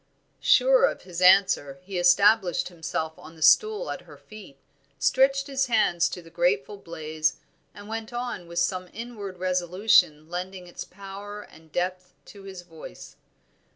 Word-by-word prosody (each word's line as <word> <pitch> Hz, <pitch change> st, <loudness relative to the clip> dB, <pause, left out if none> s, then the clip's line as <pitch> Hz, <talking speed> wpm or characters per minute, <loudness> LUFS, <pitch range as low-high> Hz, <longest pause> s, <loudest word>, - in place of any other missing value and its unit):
Sure -, -, +5 dB
of -, -, -3 dB
his 180 Hz, -1 st, -7 dB
answer 185 Hz, -7 st, +4 dB
he 185 Hz, -1 st, -4 dB
established 185 Hz, +1 st, +4 dB
himself 160 Hz, -2 st, -4 dB
on 160 Hz, -, -13 dB
the 160 Hz, -, -5 dB
stool 435 Hz, +2 st, +4 dB
at -, -, -6 dB
her -, -, -13 dB
feet, 210 Hz, -10 st, -14 dB, 0.4 s
stretched 275 Hz, +1 st, +2 dB
his 275 Hz, -1 st, -1 dB
hands 175 Hz, -7 st, +2 dB
to 180 Hz, -, -8 dB
the 165 Hz, -, -16 dB
grateful 170 Hz, 0 st, 0 dB
blaze, 160 Hz, -4 st, -3 dB, 0.4 s
and 205 Hz, 0 st, -11 dB
went 225 Hz, +1 st, -6 dB
on 240 Hz, -7 st, -5 dB
with 170 Hz, 0 st, -9 dB
some 180 Hz, +1 st, -1 dB
inward 215 Hz, -5 st, -7 dB
resolution 180 Hz, -3 st, +2 dB
lending 180 Hz, +2 st, -6 dB
its 175 Hz, -, -8 dB
power 200 Hz, +2 st, -9 dB
and 160 Hz, -4 st, -19 dB
depth 180 Hz, +1 st, -3 dB
to 200 Hz, -, -13 dB
his 190 Hz, -2 st, -10 dB
voice. 160 Hz, -, -12 dB
185 Hz, 155 wpm, -25 LUFS, 170-215 Hz, 0.4 s, Sure